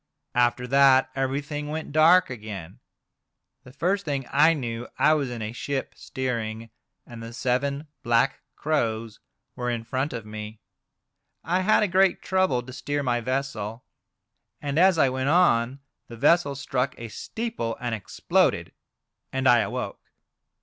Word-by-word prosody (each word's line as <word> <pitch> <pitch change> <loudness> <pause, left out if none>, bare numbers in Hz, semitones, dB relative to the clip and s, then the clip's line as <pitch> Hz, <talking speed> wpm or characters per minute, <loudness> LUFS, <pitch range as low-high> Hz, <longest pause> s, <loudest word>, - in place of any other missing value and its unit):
After 125 0 +2
that 135 0 +5
everything 145 +2 -2
went 155 +1 -5
dark 165 +3 +5
again. 105 -7 -8 0.8
The 130 - -13
first 180 +9 0
thing 140 -5 -2
I 155 +4 +5
knew 120 -4 -4
I 155 - +5
was 145 -4 0
in 120 -2 -5
a 105 - -4
ship 135 +3 -4
steering, 115 -3 -4 0.3
and 120 -1 -10
the 115 +1 -8
seven 140 +4 -1 0.2
black 120 +3 +2 0.2
crows 115 -7 -1 0.4
were 125 0 -2
in 120 -1 -2
front 130 +5 -2
of 115 -3 -6
me. 105 0 -8 0.8
I 175 +4 +1
had 215 +3 +3
a - - +2
great 190 0 +3
trouble 185 -10 +1
to 130 +1 -10
steer 145 +2 -2
my 120 -2 0
vessel. 125 -3 -3 0.7
And 145 +1 -1
as 185 -1 +5
I 140 - +5
went 130 +1 -1
on 135 -6 +3 0.3
the 115 - -10
vessel 145 +2 +3
struck 135 -1 -2
a 115 - -7
steeple, 115 - -4
and 120 -1 -3
exploded, 110 -4 0 0.6
and 130 0 0
I 120 -2 +7
awoke. - - -3
130 Hz, 150 wpm, -25 LUFS, 115-150 Hz, 0.8 s, I